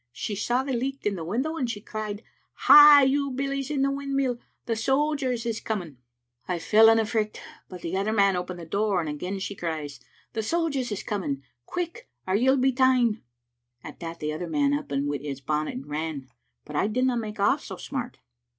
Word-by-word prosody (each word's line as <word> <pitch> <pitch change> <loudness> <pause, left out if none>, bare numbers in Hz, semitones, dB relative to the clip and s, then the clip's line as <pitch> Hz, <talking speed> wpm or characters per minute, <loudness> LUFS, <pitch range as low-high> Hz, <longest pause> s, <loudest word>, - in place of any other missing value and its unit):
She 205 - -4
saw 240 +6 0
the 270 -1 -3
licht 270 +3 -3
in 210 - +1
the 170 - -5
window, 260 - -2
and 255 -6 -1
she 220 -3 -4
cried, 215 0 -5 0.4
*Hie, 295 -1 +10
you 280 +1 +2
billies 275 +1 -3
in 280 -3 0
the 275 - +2
wind 275 0 -3
mill, 255 -3 0 0.3
the 230 - -1
sojers 265 0 0
is 230 -1 -2
coming!' 180 - -4 0.5
I 180 - -1
fell 220 +6 +6
in 225 - +5
a 225 - +2
fricht, 215 -1 -2 0.3
but 180 -2 -9
the 170 +2 -3
other 200 +3 0
man 200 -3 +3
opened 180 0 -4
the 170 - -8
door, 200 +3 0
and 165 - -2
again 180 +6 -4
she 195 +1 -4
cries, 155 -6 -4 0.3
*The 220 - -1
sojers 280 -1 -1
is 205 - -3
coming; 145 -10 -3 0.2
quick, 355 +8 -5 0.2
or 185 - -1
you'll 260 +6 +4
be 265 +1 +3
ta'en.' 250 -4 +3 0.6
At - - -10
that 165 -1 -6
the 150 0 -2
other 170 +3 -4
man 285 - +2
up 290 0 -2
wi' 145 +1 -1
his 140 -1 -5
bonnet 150 +3 -2
and 130 +2 -6
ran, 150 -3 -4 0.4
but 150 - -9
I 195 - +2
didna 255 +3 +1
make 215 -2 -4
off 235 +9 +2
so - - -7
smart." 255 -3 -5
220 Hz, 205 wpm, -26 LUFS, 175-265 Hz, 0.6 s, Hie